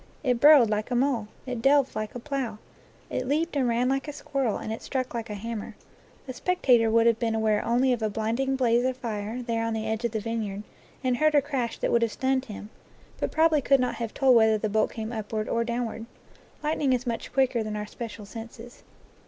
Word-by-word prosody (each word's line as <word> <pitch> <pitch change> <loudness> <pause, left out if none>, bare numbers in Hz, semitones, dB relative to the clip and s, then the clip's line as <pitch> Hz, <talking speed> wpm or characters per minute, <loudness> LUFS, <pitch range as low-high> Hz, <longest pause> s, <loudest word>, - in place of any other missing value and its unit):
It 250 -4 +1
burrowed 290 -3 +8
like 210 +2 -1
a 250 - -1
mole, 245 -4 +1 0.2
it 250 -3 -4
delved 275 +1 +3
like 215 +1 -4
a - - -4
plough, 260 -4 -3 0.5
it 255 - -2
leaped 310 +4 0
and 265 -3 +2
ran 240 +1 +1
like 270 +2 0
a - - -3
squirrel, 275 -6 -2
and 220 - -4
it 225 - -7
struck 255 -2 -3
like 230 -1 -4
a 210 - -4
hammer. 220 +1 -6 0.5
A 255 - -5
spectator 250 -8 +3
would 230 +1 +4
have 230 -1 +3
been 225 -2 0
aware 215 -1 +1
only 250 +2 +2
of 240 - -2
d 220 - 0
blinding 230 +6 -1
blaze 240 -2 +2
of 255 0 -1
fire 225 0 -4
there 230 -1 -1
on 230 0 -1
the 220 0 -3
edge 220 +1 -2
of 235 - 0
the 220 - 0
vineyard, 210 -2 -4 0.4
and 255 -1 +1
heard 310 +1 +3
a 290 - +6
crash 265 -5 -2
that - - -1
would 235 - +3
have 230 -1 +1
stunned 265 0 0
him; 210 -2 -9 0.5
but - - -1
probably 315 -2 +3
could 275 +1 +4
not 250 0 0
have 230 -2 -4
told 265 -2 +4
whether 220 -1 +5
the 215 0 -2
bolt 215 +1 +2
came 220 0 -5
upward 215 -1 -3
or 230 - 0
down 235 +1 -2
ward. 225 0 -7 0.6
Lightning 300 -3 +1
is 250 0 -1
much 235 -2 -4
quicker 260 -3 +2
than 215 -1 -4
our 210 0 -3
special 215 -1 -8
senses. 230 +3 -10
235 Hz, 230 wpm, -26 LUFS, 220-260 Hz, 0.6 s, burrowed